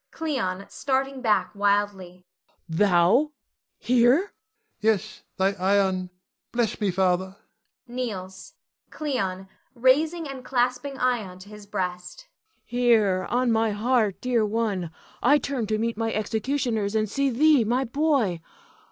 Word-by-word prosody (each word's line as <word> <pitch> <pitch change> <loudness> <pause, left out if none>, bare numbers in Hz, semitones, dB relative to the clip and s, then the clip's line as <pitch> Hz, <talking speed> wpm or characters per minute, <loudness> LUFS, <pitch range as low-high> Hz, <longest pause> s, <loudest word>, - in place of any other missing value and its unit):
Cleon 225 - -3
[starting 270 -1 -2
back 210 -6 +1
wildly]. 200 -3 -1 0.4
Thou? 190 - +3 0.4
Here! 245 +1 +4
Ion. 400 +2 -5 0.5
Yes, 215 -3 0 0.2
thy 190 +1 +2
Ion; 190 -1 +1 0.4
bless 235 -2 -1
me, 205 - +2
Father 185 +1 0 0.5
[kneels]. 200 -7 -6 0.4
Cleon 195 -11 -3 0.3
[raising 305 +7 +2
and 270 -2 -8
clasping 250 +2 -1
Ion 235 -8 -1
to 185 +2 -13
his 210 -1 -12
breast]. 185 - -4 0.4
Here, 225 -6 +2
on 245 0 +1
my 225 -1 +2
heart, 215 -3 +1
dear 245 -3 +1
one. 210 -5 -1 0.3
I 285 +5 +5
turn 270 -6 -3
to 215 0 0
meet 230 0 -2
my 225 0 -1
executioners, 220 0 -1
and 215 0 +1
see 275 +6 0
thee, 285 +1 +4
my 245 +4 +1
boy. 255 - +1
220 Hz, 125 wpm, -25 LUFS, 195-255 Hz, 0.5 s, I